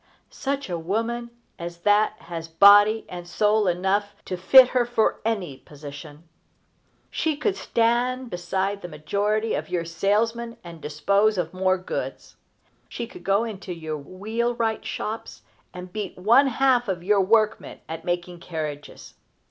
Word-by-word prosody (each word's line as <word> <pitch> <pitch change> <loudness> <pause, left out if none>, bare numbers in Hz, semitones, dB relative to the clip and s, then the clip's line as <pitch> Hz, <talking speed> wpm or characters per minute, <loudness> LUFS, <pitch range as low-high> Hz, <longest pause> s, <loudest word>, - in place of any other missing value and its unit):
Such 280 -1 -3
a 175 -2 -3
woman 230 +7 -2 0.3
as 170 0 -7
that 210 +2 +3
has 165 -3 -7
body 205 +6 +6
and 175 -1 -8
soul 210 +2 +2
enough 195 +3 0
to 185 - -3
fit 250 +8 +7
her 250 -1 +2
for 240 -2 0
any 200 -11 -2
position. 145 +3 -11 0.8
She 315 -3 -1
could 380 +7 0
stand 245 - 0
beside 190 +3 -2
the 175 - -6
majority 205 +8 -1
of - - -3
your 170 -2 -1
salesmen 225 +7 0
and 170 -2 -11
dispose 200 +8 +1
of 170 -1 -2
more 185 0 +1
goods. 185 - -6 0.5
She - - -5
could 360 - -13
go 200 +3 +2
into 195 -5 -6
your 160 -2 -5
wheelwright 225 - -2
shops 220 +2 -5 0.3
and 180 0 -10
beat 210 -3 -5
one 235 +9 +5
half 255 -1 +2
of 180 -3 -3
your 200 +1 +3
workmen 215 +2 +1
at 160 0 -6
making 175 0 -3
carriages. 155 -4 -7
200 Hz, 145 wpm, -24 LUFS, 175-225 Hz, 0.8 s, fit